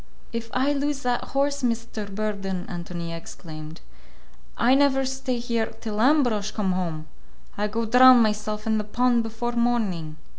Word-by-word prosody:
"If 230 0 -4
I 270 +3 +1
lose 285 0 -2
that 245 -1 0
horse, 280 +1 0
Mr. 230 -3 -2
Burden," 195 -3 -3
Ántonia 170 -2 -5
exclaimed, 155 -1 -9 0.8
"I 245 +2 +4
never 270 -1 +3
stay 265 -1 -2
here 235 -2 -1
till 215 -1 -3
Ambrosch 245 -7 +3
come 200 -4 -1
home! 170 -4 -3 0.5
I 210 +1 -1
go 225 +2 -2
drown 250 +2 +8
myself 215 -1 0
in 220 -1 +1
the - - -2
pond 240 +3 +2
before 225 +2 -3
morning." 215 -10 -1
225 Hz, 150 wpm, -25 LUFS, 200-250 Hz, 0.8 s, drown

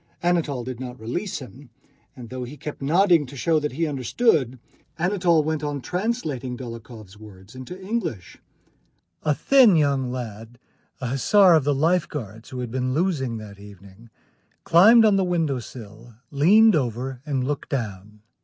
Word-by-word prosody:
Anatole 165 -7 0
did 125 -1 -7
not 125 -2 -7
release 170 - -4
him, 130 0 -12 0.5
and 120 -2 -11
though 130 -1 -5
he 130 +5 -9
kept 150 -1 -8
nodding 170 +1 +3
to 140 +2 -11
show 160 +4 +1
that 150 -3 -4
he 165 +5 -1
understood, 140 - 0 0.4
Anatole 175 -2 +2
went 155 0 -2
on 145 -1 -3
translating 155 - -3
Dólokhov's 115 -4 -10
words 100 -1 -14
into 130 +8 -9
English. 190 - -5 0.8
A 150 -2 +1
thin 255 - +5
young 140 -4 +1
lad, 115 -1 -7 0.4
an 125 - -3
hussar 180 +9 +4
of 155 -4 +3
the 145 -1 +1
Life 165 +4 +1
Guards, 110 -6 -8
who 125 -1 -6
had 120 -2 -5
been 130 +1 -2
losing 150 -9 -1
that 105 -2 -11
evening, 100 +2 -15 0.5
climbed 220 +7 +6
on 205 -2 +4
the 195 - +2
window 165 -7 0
sill, 115 -1 -12 0.2
leaned 200 +9 +5
over, 125 -1 -3
and 140 -3 -2
looked 145 +2 -4
down. 105 -4 -5
135 Hz, 160 wpm, -23 LUFS, 120-170 Hz, 0.8 s, climbed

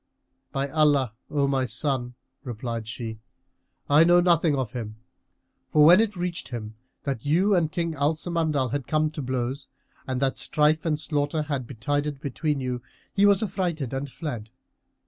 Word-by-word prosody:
"By 135 +1 -1
Allah, 145 -6 +3 0.2
O 140 -2 +1
my 135 -2 +1
son," 125 +1 -2 0.3
replied 115 -3 -4
she, 115 -2 -6 0.7
"I 145 +3 +6
know 175 +1 +6
nothing 170 -3 +3
of 130 -5 -2
him! 110 -4 -5 0.8
For 150 -1 +6
when 175 +6 +8
it 215 -3 -1
reached 175 -1 -3
him 110 -3 -6 0.3
that 135 -5 -3
you 180 +8 +3
and 165 -4 +2
King 170 0 -1
Al 145 +1 +1
Samandal 155 -6 -1
had 140 -2 -3
come 155 0 +1
to 155 - -5
blows 130 +1 -3 0.4
and 130 -1 -1
that 135 -1 0
strife 155 +2 +2
and 155 -2 +1
slaughter 150 +1 0
had 140 -5 -3
betided 145 +4 -2
between 145 +1 -2
you, 125 -2 -3 0.3
he 205 0 +5
was 200 +1 +4
affrighted 175 - -2
and 135 +1 -3
fled." 125 -8 -6
145 Hz, 165 wpm, -26 LUFS, 130-160 Hz, 0.8 s, when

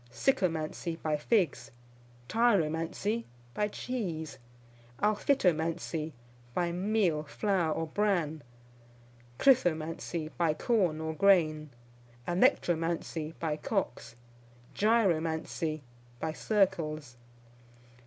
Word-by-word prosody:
Sycomancy, 165 - 0
by 155 -1 +1
figs. 150 - +1 0.6
Tyromancy, 205 0 +1 0.3
by 210 - 0
cheese. 190 -9 -4 0.6
Alphitomancy, 170 - +1 0.4
by 175 -1 +1
meal, 185 -3 +1
flour, 165 +3 0
or 165 - -1
bran. 165 -4 0 1.0
Krithomancy, 165 - +2
by 165 -3 +2
corn 180 -6 +1
or 160 0 -3
grain. 155 -5 +3 0.6
Alectromancy, 165 -2 +1
by 155 -2 -1
cocks. 135 - -3 0.6
Gyromancy, 165 -7 +1 0.4
by 160 +2 -2
circles. 160 - 0
165 Hz, 75 wpm, -30 LUFS, 155-200 Hz, 1.0 s, grain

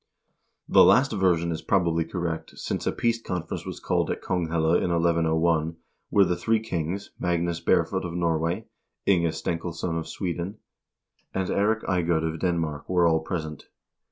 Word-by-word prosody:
The - - +7
last 135 +2 +5
version 90 -5 +2
is 80 - -3
probably 85 -4 +2
correct, 85 -1 -4
since - - -3
a - - +3
peace 115 -1 0
conference 90 -5 -4
was - - -6
called - - 0
at - - -2
Konghelle 80 -2 0
in - - 0
1101, 85 -1 +2 0.3
where 100 -1 +5
the 90 - 0
three 110 +6 +1
kings, 95 -2 -3
Magnus 85 -1 0
Barefoot - - +1
of 85 -1 -5
Nor 85 -2 +1
way, 85 +7 -2 0.4
Inge 85 -4 +3
Stenkilsson 85 0 -3
of 80 - -6
Sweden, 90 +2 -4 0.8
and 95 -1 -1
Eirik 110 +2 +1
Eiegod 85 -3 +1
of 80 0 -2
Denmark 80 -5 -1
were 90 -2 +3
all 80 -1 +3
present. 80 -2 -5
85 Hz, 155 wpm, -26 LUFS, 80-90 Hz, 0.8 s, The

